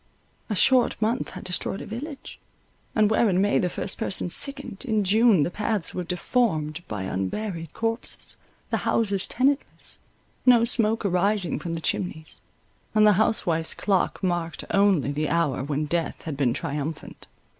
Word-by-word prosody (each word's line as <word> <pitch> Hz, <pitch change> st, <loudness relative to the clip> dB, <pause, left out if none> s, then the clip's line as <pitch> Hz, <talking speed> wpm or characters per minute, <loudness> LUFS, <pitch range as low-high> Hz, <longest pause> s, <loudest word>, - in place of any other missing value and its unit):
A 210 Hz, -, -1 dB
short 255 Hz, +4 st, +3 dB
month 225 Hz, +3 st, 0 dB
has 185 Hz, -, -7 dB
destroyed 185 Hz, +2 st, -1 dB
a -, -, -7 dB
village, 275 Hz, +6 st, -7 dB, 0.6 s
and 215 Hz, -1 st, +4 dB
where 220 Hz, 0 st, +3 dB
in 185 Hz, -1 st, +2 dB
May 205 Hz, +1 st, +3 dB
the 180 Hz, -, 0 dB
first 185 Hz, -, -4 dB
person 185 Hz, -, -1 dB
sickened, 275 Hz, -1 st, -1 dB
in 220 Hz, -5 st, +1 dB
June 210 Hz, -3 st, +4 dB
the 170 Hz, -, -2 dB
paths 210 Hz, -2 st, -2 dB
were 180 Hz, -, -3 dB
deformed 170 Hz, -4 st, 0 dB
by 105 Hz, -3 st, -4 dB
unburied 165 Hz, -, -3 dB
corpses—the 225 Hz, +1 st, -4 dB
houses 200 Hz, -4 st, +1 dB
tenantless, 270 Hz, +3 st, -1 dB, 0.4 s
no 245 Hz, -2 st, +6 dB
smoke 225 Hz, -2 st, +3 dB
arising 195 Hz, 0 st, +1 dB
from 165 Hz, -1 st, -4 dB
the 165 Hz, -, -5 dB
chimneys; 160 Hz, -3 st, -3 dB, 0.5 s
and 215 Hz, 0 st, +6 dB
the 210 Hz, -, +7 dB
housewife's 165 Hz, -7 st, +1 dB
clock 195 Hz, -1 st, 0 dB
marked 175 Hz, -2 st, -1 dB
only 195 Hz, -8 st, +3 dB
the 150 Hz, +1 st, -1 dB
hour 165 Hz, -6 st, 0 dB
when 145 Hz, +2 st, -1 dB
death 165 Hz, +2 st, -2 dB
had 155 Hz, -3 st, -4 dB
been 135 Hz, -3 st, +1 dB
triumphant. 145 Hz, +5 st, -5 dB
190 Hz, 155 wpm, -25 LUFS, 165-220 Hz, 0.6 s, the